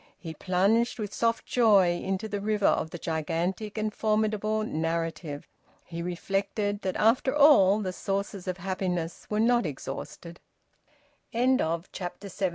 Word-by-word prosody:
He 165 Hz, -3 st, -7 dB
plunged 200 Hz, +8 st, +1 dB
with 210 Hz, -2 st, -5 dB
soft 230 Hz, -1 st, 0 dB
joy 205 Hz, -7 st, +4 dB
into 195 Hz, +3 st, -2 dB
the 205 Hz, -1 st, -4 dB
river 210 Hz, -1 st, 0 dB
of 160 Hz, -, +2 dB
the 175 Hz, -, -7 dB
gigantic 170 Hz, +6 st, -2 dB
and 215 Hz, 0 st, -1 dB
formidable 215 Hz, 0 st, 0 dB
narrative. 165 Hz, -4 st, -3 dB, 0.4 s
He 170 Hz, 0 st, -6 dB
reflected 195 Hz, +4 st, -2 dB
that 185 Hz, -, -2 dB
after 250 Hz, +5 st, +2 dB
all 215 Hz, -9 st, +6 dB
the 185 Hz, -2 st, -3 dB
sources 195 Hz, 0 st, -3 dB
of 185 Hz, 0 st, -2 dB
happiness 180 Hz, -2 st, -3 dB
were 210 Hz, -, 0 dB
not 235 Hz, -3 st, +3 dB
exhausted. 170 Hz, +4 st, -7 dB, 0.9 s
VOLUME 255 Hz, +3 st, +3 dB
TWO, 165 Hz, +1 st, -1 dB
CHAPTER 190 Hz, +2 st, -6 dB
ONE. 190 Hz, -2 st, +2 dB
195 Hz, 145 wpm, -28 LUFS, 175-215 Hz, 0.9 s, all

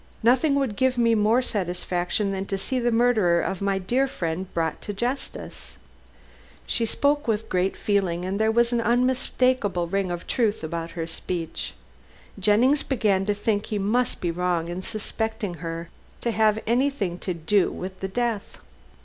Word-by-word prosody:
Nothing 260 Hz, +5 st, +4 dB
would 270 Hz, -7 st, 0 dB
give 260 Hz, -1 st, +2 dB
me 230 Hz, -1 st, +4 dB
more 220 Hz, +4 st, +3 dB
satisfaction 180 Hz, -1 st, -1 dB
than 195 Hz, 0 st, -3 dB
to 195 Hz, -, -1 dB
see 255 Hz, +7 st, -1 dB
the 240 Hz, 0 st, +2 dB
murderer 225 Hz, -7 st, +3 dB
of 190 Hz, +2 st, -2 dB
my 195 Hz, -1 st, +1 dB
dear 245 Hz, +9 st, +1 dB
friend 180 Hz, -7 st, -3 dB
brought 160 Hz, -2 st, -1 dB
to 205 Hz, -, -5 dB
justice." 245 Hz, +7 st, -5 dB, 0.9 s
She 230 Hz, -1 st, 0 dB
spoke 290 Hz, +4 st, +1 dB
with 220 Hz, 0 st, 0 dB
great 185 Hz, +1 st, 0 dB
feeling, 185 Hz, -4 st, 0 dB
and 195 Hz, +2 st, -2 dB
there 220 Hz, 0 st, +3 dB
was 235 Hz, +1 st, +3 dB
an 235 Hz, -, +2 dB
unmistakable 250 Hz, -4 st, +1 dB
ring 195 Hz, +1 st, 0 dB
of 175 Hz, -1 st, -4 dB
truth 220 Hz, -7 st, 0 dB
about 165 Hz, +1 st, -3 dB
her 165 Hz, -, -1 dB
speech. 165 Hz, 0 st, -5 dB, 0.6 s
Jennings 230 Hz, +9 st, +4 dB
began 205 Hz, -7 st, +1 dB
to 205 Hz, -, +2 dB
think 205 Hz, 0 st, 0 dB
he 215 Hz, -, -2 dB
must 220 Hz, +5 st, 0 dB
be 175 Hz, -, 0 dB
wrong 175 Hz, -1 st, -1 dB
in 175 Hz, +2 st, -4 dB
suspecting 215 Hz, 0 st, -3 dB
her 165 Hz, 0 st, -5 dB, 0.3 s
to 235 Hz, -, 0 dB
have 215 Hz, -1 st, +3 dB
anything 235 Hz, -7 st, 0 dB
to 180 Hz, -, -3 dB
do 175 Hz, +4 st, +2 dB
with 185 Hz, +1 st, -6 dB
the 190 Hz, -, -2 dB
death. 230 Hz, 0 st, -2 dB
205 Hz, 165 wpm, -25 LUFS, 180-240 Hz, 0.9 s, Nothing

